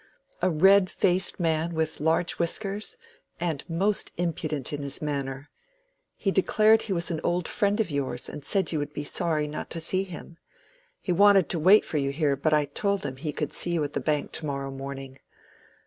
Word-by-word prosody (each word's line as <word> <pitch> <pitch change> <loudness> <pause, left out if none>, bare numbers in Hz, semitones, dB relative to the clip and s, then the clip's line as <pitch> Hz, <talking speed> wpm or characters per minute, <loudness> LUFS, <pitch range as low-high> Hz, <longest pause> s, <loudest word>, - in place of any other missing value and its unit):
"A 185 - +3
red 190 +4 +5
faced 185 0 +1
man 165 0 0
with 160 -1 -1
large 165 +2 +1
whiskers, 200 +4 -2 0.4
and 165 -5 -2
most 195 +5 +1
impudent 155 -5 -3
in 145 - -3
his 140 -1 -4
manner. 140 -2 -4 0.6
He 195 - -1
declared 215 +3 +4
he 210 - -6
was 175 -1 0
an 160 - -3
old 175 0 0
friend 205 -2 0
of 210 -7 0
yours, 130 -4 -3
and 150 - -8
said 190 +2 +1
you 155 - -1
would 145 0 -4
be 145 - -4
sorry 155 -1 0
not 150 +1 -6
to 165 - -3
see 185 +3 +1
him. 170 -2 -10 0.6
He 185 - -2
wanted 200 0 +5
to 170 - -1
wait 190 +7 +6
for 155 - -2
you 140 -1 0
here, 140 0 +1
but 145 +3 0
I 150 -1 +3
told 200 +8 -1
him 130 - -4
he 150 +2 -3
could 150 0 -4
see 175 - +2
you 165 -3 +1
at 145 0 -4
the - - -1
Bank 150 -2 -1
to 160 - -4
morrow 140 -1 -3
morning. 135 0 -7
160 Hz, 200 wpm, -26 LUFS, 145-185 Hz, 0.6 s, wait